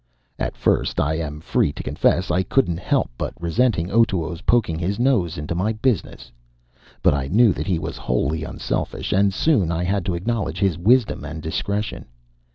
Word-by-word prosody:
At - - -3
first, - - +1
I 75 +2 +1
am 75 -2 -4
free 75 - +1
to - - -7
confess, 90 0 +1
I 90 +1 +2
couldn't 95 -5 +1
help - - 0 0.3
resenting 90 +1 +1
Otoo's 90 -7 +1
poking 100 -7 +1
his 95 +4 -1
nose 115 -10 +1
into 75 +3 -3
my 100 +6 0
business. 110 - -2 0.7
But - - +5
I 70 -2 -1
knew 110 - +4
that - - -5
he 90 -4 +1
was 80 -1 -5
wholly 75 +6 -1
unselfish; - - -3
and 100 +1 +3
soon 100 - +2
I 85 +1 -1
had 95 +1 0
to 90 - 0
acknowledge 100 -2 -2
his 95 -2 +1
wisdom 110 - +2
and 75 +1 -6
discretion. 100 +7 -3
90 Hz, 170 wpm, -22 LUFS, 80-105 Hz, 0.7 s, But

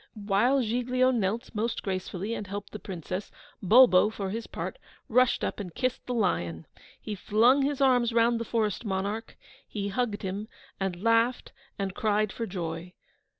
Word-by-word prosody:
While 215 +6 +2
Giglio 250 +3 +2
knelt 225 -1 -1
(most 225 +2 -2
gracefully) 190 +2 -3
and 210 -3 -5
helped 200 +1 -6
the 210 - -7
Princess, 185 +1 -5 0.3
Bulbo, 210 -1 +7
for 200 -3 -4
his 225 +2 -4
part, - - -5 0.3
rushed 250 +2 +3
up - - -2
and 180 -5 -7
kissed 255 0 -2
the 250 - -1
lion. 85 - 0 0.3
He 215 - -5
flung 225 +7 +4
his 280 0 0
arms 250 -3 +4
round 230 0 +3
the - - -2
forest 225 -2 -1
monarch; 205 +2 -3 0.3
he 200 -2 -3
hugged 220 -1 -2
him, 195 +3 -4 0.3
and 190 -1 -3
laughed 230 +2 +2 0.3
and 195 -1 -2
cried 210 0 +1
for 230 - -4
joy. 170 -1 -5
215 Hz, 160 wpm, -28 LUFS, 195-240 Hz, 0.3 s, Bulbo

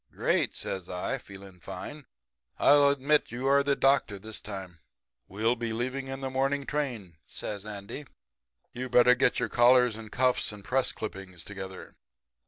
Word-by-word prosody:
"'Great!' - - 0
says 95 -2 -4
I, 90 +9 -2
feeling 95 -3 -13
fine. 100 - -8 0.5
'I'll 145 0 +6
admit 140 +2 +2
you 120 +3 -4
are 140 +1 +5
the 140 0 +1
doctor 135 -8 +2
this 110 +2 -8
time.' 95 -4 -8 0.5
"'We'll 110 +5 +1
be 115 -2 -3
leaving 130 +3 -3
on 135 0 -5
the 135 - -2
morning 135 +2 0
train,' 120 - -3
says 105 0 -6
Andy. 105 +7 -7 0.7
'You'd 125 +1 -5
better 125 0 +7
get 125 0 +2
your 125 - 0
collars 125 0 +5
and 110 -1 -9
cuffs 125 -2 +1
and 105 -1 -11
press 130 0 +1
clippings 95 -5 -7
together.' 95 -2 -8
120 Hz, 160 wpm, -29 LUFS, 100-135 Hz, 0.7 s, better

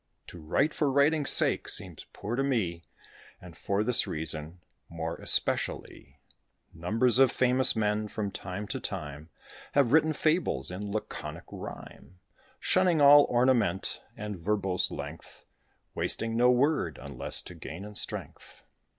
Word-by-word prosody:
To 90 - -11
write 140 - 0
for 145 -3 0
writing's 145 +1 +2
sake - - +2
seems - - 0
poor 110 +4 -5
to 135 - -1
me; 105 -12 -1 0.6
And 90 -2 -13
for 100 +1 -2
this 120 +1 +4
reason, 80 +2 -1 0.3
more 85 0 -5
especially - - -1 0.5
Numbers 115 +9 +1
of 135 -2 +5
famous 130 0 +3
men, 105 -1 -1
from 105 -1 -4
time 95 +2 -6
to 130 - -4
time, 75 - -7 0.4
Have 140 -5 +2
written 155 +1 +3
fables 155 - -1
in 100 +3 -6
laconic 110 +1 -6
rhyme, 90 - -11 0.4
Shunning 185 -3 +2
all 145 0 +7
ornament 120 -7 +1 0.2
and 105 -3 -6
verbose 95 0 -1
length, - - -9 0.5
Wasting 115 0 +1
no 120 +2 +4
word, 125 - +1
unless 70 -1 +1
to - - -10
gain 85 +3 -9
in 105 - -10
strength. - - -3
105 Hz, 135 wpm, -28 LUFS, 90-130 Hz, 0.6 s, all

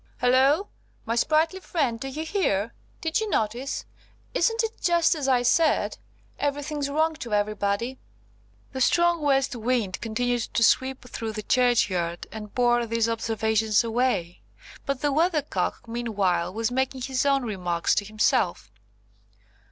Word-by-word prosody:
Halloo! 265 +7 +4 0.4
my 230 - -1
sprightly 320 +8 +2
friend, 280 -11 -1
do 270 - -5
you 300 +4 -5
hear? 235 - 0 0.3
Did 325 +3 0
you 435 - -2
notice? 240 - -2 0.5
Isn't 455 0 +2
it 450 0 -5
just 345 -1 +3
as 295 -4 -3
I 250 -2 +3
said? 315 +6 +2 0.4
Everything's 290 0 -2
wrong 315 +3 +1
to 235 -8 -3
everybody." 210 +4 -1 0.7
The 260 - -4
strong 345 +4 +3
west 270 -3 +1
wind 230 -5 -1
continued 245 +2 -1
to 230 - +3
sweep 260 +2 +2
through 225 -3 -5
the 215 0 -5
churchyard, 200 -9 +1
and 210 -2 -9
bore 240 -1 +2
these 230 0 +1
observations 220 -1 +1
away; 230 -7 -1 0.5
but 275 -2 -2
the 290 - +1
Weathercock 300 - 0
meanwhile 205 -8 -1
was 225 +3 -2
making 260 +1 -1
his 260 0 -1
own 275 -2 +2
remarks 180 -6 -1
to - - +1
himself. 215 - 0
245 Hz, 140 wpm, -25 LUFS, 220-285 Hz, 0.7 s, Halloo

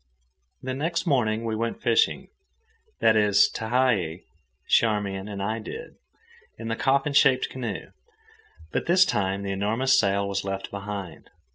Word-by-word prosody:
The 130 0 -3
next 165 +6 -2
morning 115 -7 +1
we 110 -1 -1
went 115 +1 -3
fishing, 445 - +1 0.7
that 110 - +5
is, 105 -2 +5
Tehei, 110 -8 0 0.4
Charmian, 105 -3 +1
and 100 -2 -5
I 110 +3 -2
did, 460 - -8 0.6
in 115 - -6
the 115 - -1
coffin 135 +4 +1
shaped 135 -2 +4
canoe; 130 -2 -5 0.8
but - - -2
this 185 +2 +5
time 100 - -1
the 100 - -3
enormous 110 +7 +2
sail 100 -1 +1
was 100 0 -2
left 95 0 -5
behind. 100 -4 -7
110 Hz, 140 wpm, -25 LUFS, 100-130 Hz, 0.8 s, that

